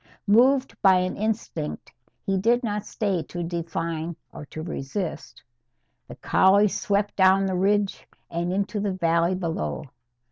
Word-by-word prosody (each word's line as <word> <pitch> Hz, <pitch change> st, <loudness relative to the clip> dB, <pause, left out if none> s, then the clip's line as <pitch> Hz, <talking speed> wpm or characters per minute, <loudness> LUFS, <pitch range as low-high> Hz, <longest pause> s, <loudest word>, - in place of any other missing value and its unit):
Moved 255 Hz, +6 st, +4 dB
by 190 Hz, -2 st, +6 dB
an 185 Hz, 0 st, -1 dB
instinct 205 Hz, -, -3 dB, 0.3 s
he 195 Hz, -, +1 dB
did 235 Hz, +6 st, +2 dB
not 210 Hz, -2 st, -3 dB
stay 195 Hz, -5 st, -1 dB
to 175 Hz, -1 st, -4 dB
define 165 Hz, -1 st, -3 dB, 0.2 s
or 145 Hz, -, -9 dB
to 155 Hz, -, -7 dB
resist, 165 Hz, +2 st, -5 dB, 0.6 s
the -, -, -9 dB
collie 200 Hz, +2 st, +4 dB
swept 205 Hz, +1 st, -1 dB
down 190 Hz, 0 st, +4 dB
the 190 Hz, -, -1 dB
ridge 200 Hz, +2 st, 0 dB, 0.2 s
and 170 Hz, +1 st, -2 dB
into 200 Hz, +2 st, -1 dB
the 200 Hz, -1 st, -1 dB
valley 170 Hz, 0 st, +1 dB
below. 165 Hz, -, -3 dB
190 Hz, 140 wpm, -25 LUFS, 170-205 Hz, 0.6 s, by